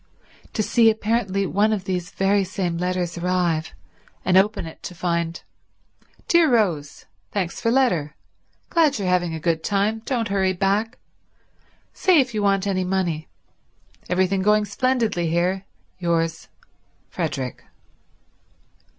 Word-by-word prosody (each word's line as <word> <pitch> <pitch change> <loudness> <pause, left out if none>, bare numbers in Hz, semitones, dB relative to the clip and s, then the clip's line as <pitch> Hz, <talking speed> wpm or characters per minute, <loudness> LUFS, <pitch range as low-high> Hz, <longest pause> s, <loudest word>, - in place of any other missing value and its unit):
To 215 - 0
see 230 +1 +4
apparently 215 -3 0
one 205 +4 +2
of 205 -4 -1
these 180 -2 -3
very 195 +1 +2
same 185 -2 -2
letters 180 -1 -2
arrive, 175 -3 0 0.5
and 185 - +3
open 200 0 +3
it 160 - -10
to 180 - -7
find: 170 -1 -2 0.8
Dear 340 -2 +5
Rose—Thanks 180 - -2
for 230 - +1
letter. 205 - +1 0.6
Glad 315 -6 +3
you're 195 -3 -2
having 175 -2 +1
a - - -5
good 165 0 0
time. 205 +2 0
Don't 235 -4 -1
hurry 190 -1 +1
back. 205 +6 0 1.0
Say 370 -4 +4
if 260 -3 +1
you 215 - -1
want 195 -1 +2
any 190 -2 0
money. 180 -4 -1 0.8
Everything 185 +1 +1
going 210 +1 +3
splendidly 225 -6 0
here— 180 +3 0 0.3
Yours, 165 -2 -1 0.6
Frederick. 130 -2 -4
190 Hz, 125 wpm, -23 LUFS, 175-215 Hz, 1.0 s, Dear